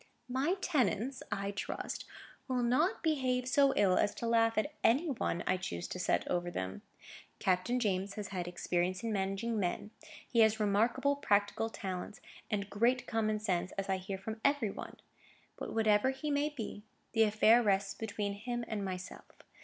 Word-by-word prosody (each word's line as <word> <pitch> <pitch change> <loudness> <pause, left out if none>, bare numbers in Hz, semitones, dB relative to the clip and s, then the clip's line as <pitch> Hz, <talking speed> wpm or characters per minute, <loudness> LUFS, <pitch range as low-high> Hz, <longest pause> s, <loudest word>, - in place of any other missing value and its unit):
"My 270 +8 +1
tenants, 255 - 0
I 200 0 -1
trust, 200 - -4 0.4
will 255 -2 0
not 260 +10 +2
behave 255 -5 +1
so 275 +1 +4
ill 195 -3 +4
as 205 - +1
to - - -4
laugh 225 -1 +3
at 290 +8 0
any 290 +7 +3
one 175 -8 -1
I 185 - +2
choose 85 - -4
to 185 - -5
set 180 - +1
over 175 0 0
them. 95 - -4 0.6
Captain 185 +7 +1
James 200 -3 -1
has 210 -2 -5
had 180 -3 -3
experience 180 +2 -1
in 225 -1 -1
managing 195 +3 -1
men. 195 +3 -2 0.4
He 235 - +1
has 220 0 +5
remarkable 220 +7 +2
practical 205 -2 +1
talents, 190 -1 -5 0.3
and 200 -2 -1
great 235 +5 +2
common 215 -2 0
sense, 185 -3 -1
as 195 0 -4
I 190 - +2
hear 190 +1 -5
from 220 +3 -6
every 280 -7 +2
one. - - -8 0.6
But, - - -6
whatever 220 +1 +3
he 270 +3 -3
may 290 +1 +1
be, 225 -7 -6 0.3
the 225 - +2
affair 220 +2 +6
rests 195 -2 +1
between 205 -1 -3
him 240 +3 -4
and 210 -2 -3
myself. 185 -1 -6
215 Hz, 170 wpm, -33 LUFS, 195-245 Hz, 0.6 s, affair